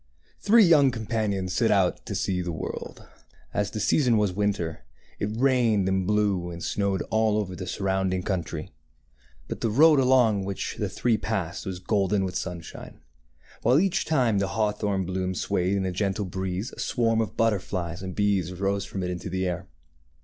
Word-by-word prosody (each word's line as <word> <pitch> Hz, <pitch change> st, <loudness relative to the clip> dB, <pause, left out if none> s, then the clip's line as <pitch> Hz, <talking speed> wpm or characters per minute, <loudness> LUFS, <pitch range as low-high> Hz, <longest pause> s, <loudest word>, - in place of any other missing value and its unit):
¥ -, -, -28 dB
T 205 Hz, -, -3 dB
HREE 230 Hz, -1 st, +8 dB
young 145 Hz, -5 st, +6 dB
companions 110 Hz, -5 st, -2 dB
set 115 Hz, +4 st, +2 dB
out 95 Hz, -3 st, +1 dB
to -, -, -3 dB
see 90 Hz, -2 st, -1 dB
the 90 Hz, -1 st, -3 dB
world. 80 Hz, -, -6 dB, 0.5 s
As 105 Hz, -1 st, 0 dB
the 110 Hz, -, -5 dB
season 120 Hz, +2 st, +3 dB
was 105 Hz, -3 st, +1 dB
winter, 100 Hz, -5 st, -2 dB, 0.4 s
it 100 Hz, -, -1 dB
rained 120 Hz, -6 st, +3 dB
and 95 Hz, -1 st, 0 dB
blew 100 Hz, -4 st, +1 dB
and 85 Hz, 0 st, -7 dB
snowed 100 Hz, -2 st, 0 dB
all 110 Hz, -1 st, +2 dB
over 95 Hz, -4 st, -2 dB
the 90 Hz, 0 st, -6 dB
surrounding 95 Hz, -2 st, -1 dB
coun 95 Hz, -3 st, -1 dB
try, 80 Hz, -1 st, -7 dB, 0.8 s
but -, -, -6 dB
the 115 Hz, -, +1 dB
road 150 Hz, +6 st, +6 dB
along 125 Hz, -6 st, +4 dB
which 100 Hz, 0 st, -4 dB
the -, -, -2 dB
three 120 Hz, -3 st, +1 dB
passed 100 Hz, -3 st, -3 dB
was 95 Hz, -1 st, -3 dB
golden 95 Hz, +1 st, +1 dB
with 90 Hz, -1 st, -5 dB
sunshine; 90 Hz, -3 st, -6 dB, 0.6 s
while 125 Hz, +5 st, +4 dB
each 190 Hz, 0 st, +1 dB
time 125 Hz, -10 st, +2 dB
the 100 Hz, -, 0 dB
hawthorn 105 Hz, -3 st, 0 dB
bloom 95 Hz, 0 st, -2 dB
swayed 90 Hz, +2 st, 0 dB
in 95 Hz, -, -1 dB
a 95 Hz, -, -1 dB
gentle 100 Hz, +2 st, -1 dB
breeze 95 Hz, +3 st, -3 dB
a -, -, -13 dB
swarm 115 Hz, -2 st, +1 dB
of 110 Hz, -2 st, -4 dB
but 115 Hz, 0 st, +4 dB
terflies 90 Hz, -3 st, -4 dB
and 95 Hz, -1 st, -6 dB
bees 100 Hz, -4 st, +1 dB
rose 100 Hz, +1 st, -1 dB
from 95 Hz, -, -5 dB
it 90 Hz, -, -2 dB
into 90 Hz, +1 st, -5 dB
the 95 Hz, +1 st, -1 dB
air. 90 Hz, 0 st, -3 dB
100 Hz, 190 wpm, -26 LUFS, 95-110 Hz, 0.8 s, HREE